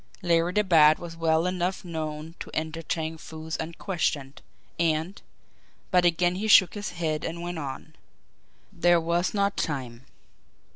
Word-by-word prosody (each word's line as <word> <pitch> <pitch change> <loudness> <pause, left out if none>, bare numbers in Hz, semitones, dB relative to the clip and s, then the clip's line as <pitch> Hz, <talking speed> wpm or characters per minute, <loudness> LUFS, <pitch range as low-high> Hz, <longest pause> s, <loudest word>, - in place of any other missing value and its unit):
Larry 170 0 +2
the 210 - +3
Bat 155 -5 +6
was 170 -1 -8
well 165 0 +2
enough 180 +1 -2
known 155 -1 -5
to - - -7
enter 160 +1 -3
Chang 160 0 -3
Foo's 160 0 -7
unquestioned, 160 -4 -3 0.4
and 165 +3 0 0.7
but 180 -2 +4
again 175 +1 +3
he 215 +3 -2
shook 185 -5 +7
his 205 0 -4
head 160 -3 -2
and 170 +1 -4
went 175 -1 -4
on. 135 -3 -7 0.8
There 175 0 +4
was 170 +4 0
not 200 0 +1
time. 130 -5 -4
165 Hz, 145 wpm, -26 LUFS, 155-175 Hz, 0.8 s, shook